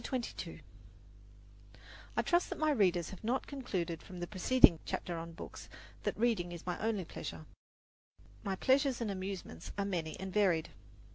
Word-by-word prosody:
CHAPTER 260 - 0
XXII - - -7 1.6
I - - +5
trust 350 0 +3
that - - -4
my 310 -1 +3
readers 180 - +3
have 190 - -10
not 245 +4 +1
concluded 185 - -3
from 180 -2 -9
the 175 - -2
preceding 185 -1 +6
chapter 175 - -3
on 165 0 -7
books - - -9 0.3
that - - -1
reading 215 -7 +2
is 170 -2 -7
my 180 -1 -2
only 215 -4 0
pleasure; - - -6 1.0
my 195 -3 -1
pleasures 265 +4 +3
and 225 -4 -1
amusements 185 - -5
are 200 - +1
many 170 -5 -2
and 190 -1 -5
varied. 185 -6 +3
190 Hz, 160 wpm, -34 LUFS, 175-235 Hz, 1.6 s, preceding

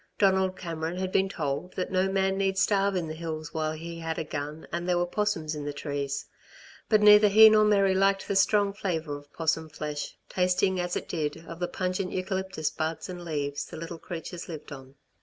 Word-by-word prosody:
Donald 190 -1 +3
Cameron 165 -1 -4
had 185 0 -2
been 195 0 +2
told 155 0 -3
that 185 - -3
no 185 +1 +2
man 190 0 +1
need 195 0 0
starve 195 0 +2
in 175 -3 -1
the 155 - -4
hills 155 -1 -5
while 155 -1 -1
he 165 +1 -7
had 165 -1 -3
a - - -1
gun, 150 +1 -6
and 175 +1 -3
there 175 - +3
were 175 - +2
'possums 175 -5 -1
in 150 -1 -5
the 145 - -3
trees. 140 -1 -3 0.6
But 215 -2 +5
neither 210 0 +8
he 220 +2 +9
nor 215 0 +6
Mary 200 -2 +4
liked 195 +1 +2
the 200 - -1
strong 200 +1 +3
flavour 165 -7 -2
of 145 0 -12
'possum 160 -1 -1
flesh, 150 -1 -5
tasting 185 +1 +1
as 175 0 -2
it - - -3
did, 160 0 -3
of 165 0 -8
the 180 - -1
pungent 185 +1 -2
eucalyptus 190 -3 -2
buds 160 +3 -3
and 180 -1 -6
leaves 145 -3 -3
the - - -9
little 165 +1 -7
creatures 170 +1 -7
lived 155 -3 -8
on. 135 -1 -10
175 Hz, 210 wpm, -28 LUFS, 155-190 Hz, 0.6 s, he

